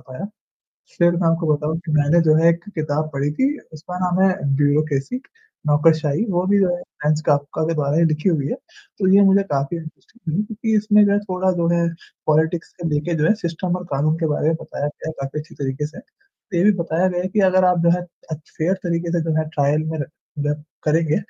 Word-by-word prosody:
पाया। 130 +10 -6 0.7
फिर 175 0 +5
मैं 175 -1 +1
आपको 165 -2 +2
बताऊँ 150 +2 -2
कि 155 - -2
मैंने 150 +3 +4
जो 155 -1 +4
है, 165 +1 +5
एक 170 0 -2
किताब 155 -1 -2
पढ़ी 140 +1 -1
थी, 275 - 0
उसका 170 +4 -7
नाम 180 0 0
है, 185 - +1 0.2
ब्यूरोक्रेसी 145 - +1 0.5
नौकरशाही, 150 +3 +3
वो 180 -1 +1
भी 200 +1 +3
जो 190 - +3
है 175 - -9 0.2
फ्रेंच 150 +1 +2
कॉफका 145 +1 +1
का - - +1
के 165 - 0
बारे 145 0 0
में 170 - +4
लिखी 155 +4 0
हुई 150 -6 +1
है, - - -1
तो 190 - -7
ये 200 - +7
मुझे 195 +1 +5
काफ़ी 140 +4 -1
दिलचस्प 160 +8 -13
लगी 175 +7 +1
क्योंकि 220 +1 -2
इसमें 210 0 +5
जो 200 - +3
है 200 - +3
थोड़ा 185 -2 -1
जो 170 -2 0
है 170 0 +2 0.4
पॉलिटिक्स 160 +2 +1
के 170 - -1
लेके 150 +3 -1
जो 150 - +2
है 165 - +5
सिस्टम 175 -2 -3
और 180 - -7
कानून 155 +3 +1
के 165 - 0
बारे 150 - 0
में 160 - +2
बताया 145 - -4
गया 150 +2 -6
काफ़ी 135 +2 -4
अच्छी 155 - -13
तरीके 135 +1 -3
से। 155 +3 -12 0.6
ये - - +3
भी 210 - +6
बताया 170 +3 +1
गया 180 -1 -2
है 185 - -2
कि 210 +3 0
अगर 185 0 +4
आप 180 -1 +3
जो 170 - +4
है, - - -5 0.3
अच्छे 155 0 -8
फेयर 170 +4 +2
तरीके 170 -1 -1
से 175 - +1
जो 155 - +1
है 155 -1 -1
ट्रायल 145 +1 +2
में 160 - -3
र 145 - -2 0.3
मतलब 145 +1 -2 0.2
करेंगे, 155 0 +2
160 Hz, 230 wpm, -21 LUFS, 150-180 Hz, 0.7 s, ये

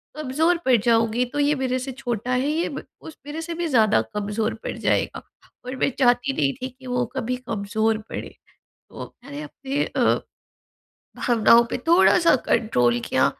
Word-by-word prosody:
कमज़ोर 305 +4 +1
पड़ 260 -1 +5
जाऊँगी 230 +1 +2
तो 290 - -2
ये 290 +1 +3
मेरे 260 -2 -1
से 260 +1 -5
छोटा 245 -2 -4
है 295 +7 0
ब - - -6 0.2
उस 320 - -10
ये 290 0 -12
मेरे 320 +2 -5
से 335 +1 -5
भी 345 0 -2
ज़्यादा 220 - +3
कमज़ोर 210 +2 -2
पड़ - - -4
जाएगा - - 0 0.4
और 255 +1 -5
मैं 260 - +1
चाहती 245 +1 +3
नहीं 140 - +1
थी 255 - -3
कि 255 +1 -15
वो 245 0 0
कभी 250 -1 -2
कमज़ोर 220 -2 -1
पड़े। - - -6 0.6
तो - - -8 0.2
मैंने 285 +3 -8
अपने 285 -1 -3
अ, - - -3 1.2
भावनाओं 235 -1 +4
पे - - -2
थोड़ा-सा 340 0 +5
कंट्रोल 120 - +2
किया - - +2
255 Hz, 170 wpm, -23 LUFS, 225-285 Hz, 1.2 s, पड़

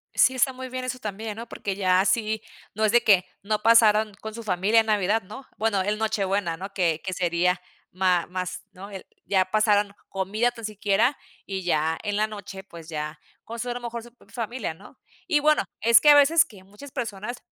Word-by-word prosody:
Sí 260 - +4
está 260 +1 +2
muy 260 0 -7
bien 255 0 -5
eso 255 0 -3
también, 210 0 -5
¿no? 230 0 -7
Porque 200 -2 -4
ya 185 -2 +3
así 215 +2 0 0.3
no 215 +2 -2
es 210 - +3
de 240 +1 +4
que 190 -4 +5 0.2
no 210 +1 -1
pasaron 220 -1 +5
con 220 0 -6
su 230 0 -7
familia 200 +3 +3
en 225 - +1
Navidad, 210 +1 +2
¿no? 215 +8 -10
Bueno 215 -3 +1
el 210 +2 -1
Nochebuena, 200 -5 -1
¿no? 195 +2 -8
Que 165 -4 +1
que 190 - -3
sería 180 0 +1 0.3
má 180 -2 +2
más, 185 0 -5
¿no? 195 +2 -11
El, 190 -2 -8 0.2
ya 190 -2 +2
pasaron, 210 -2 +2 0.2
comida 205 +5 0
tan 235 -1 -12
siquiera 215 +5 +1 0.3
y 190 -1 -4
ya 160 -2 +1
en 205 -1 -2
la 215 - +2
noche 200 -2 -9
pues 170 -4 -12
ya 150 -1 -5 0.2
con 230 +1 -8
su 245 +1 -3
eh 245 - -3
mejor 235 -1 -6
su 240 - -14 0.2
familia, 230 -5 -4
¿no? - - -17 0.3
Y 310 -4 +3
bueno, 305 +1 +3 0.2
es 230 0 +7
que 295 - +6
a 290 - +9
veces 290 +3 +6
que 195 -4 -16
muchas 205 +9 -13
personas, 220 +1 -5
210 Hz, 210 wpm, -25 LUFS, 190-230 Hz, 0.3 s, a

